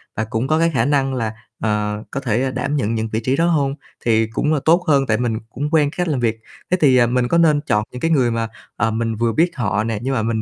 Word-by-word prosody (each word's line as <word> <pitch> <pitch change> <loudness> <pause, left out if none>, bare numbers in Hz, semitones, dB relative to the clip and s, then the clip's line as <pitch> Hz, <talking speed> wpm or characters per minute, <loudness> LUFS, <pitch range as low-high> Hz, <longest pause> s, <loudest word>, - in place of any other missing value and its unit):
và 110 - -1
cũng 110 +4 -2
có 155 +2 +2
cái 165 0 +2
khả 115 -3 +2
năng 135 -1 +1
là, 115 -3 -2 0.3
ờ, 105 -1 -1
có 140 - -2
thể, 120 -4 0
ơ, 130 - -1
đảm 145 +2 -2
nhận 115 -4 0
những 110 0 -2
vị 110 - 0
trí 130 +3 +1
đó 165 +3 +2
hông 140 -4 +1 0.3
thì 110 -1 +3
cũng 150 +7 0
là 150 - +1
tốt 170 +3 +4
hơn, 140 -3 +3
tại 110 - +2
mình 115 -2 -1
cũng 140 +6 -4
quen 150 -3 +3
cách 180 - 0
làm 145 -5 0
việc. 115 -2 0 0.3
Thế 185 - +3
thì, 130 -4 +5
ờ, 120 - +4
mình 125 0 +1
có 170 - +2
nên 155 -3 +4
chọn 105 -7 0
những 125 - -8
cái 165 - +1
người 130 -6 +3
mà, 115 0 -1 0.3
ờ, 110 +1 0
mình 115 0 -1
vừa 115 +1 0
biết 170 +6 +2
họ 105 -4 0
nè 110 -2 -2
nhưng 135 +2 -2
mà 115 -4 0
mình 110 0 -1
125 Hz, 290 wpm, -20 LUFS, 110-145 Hz, 0.3 s, thì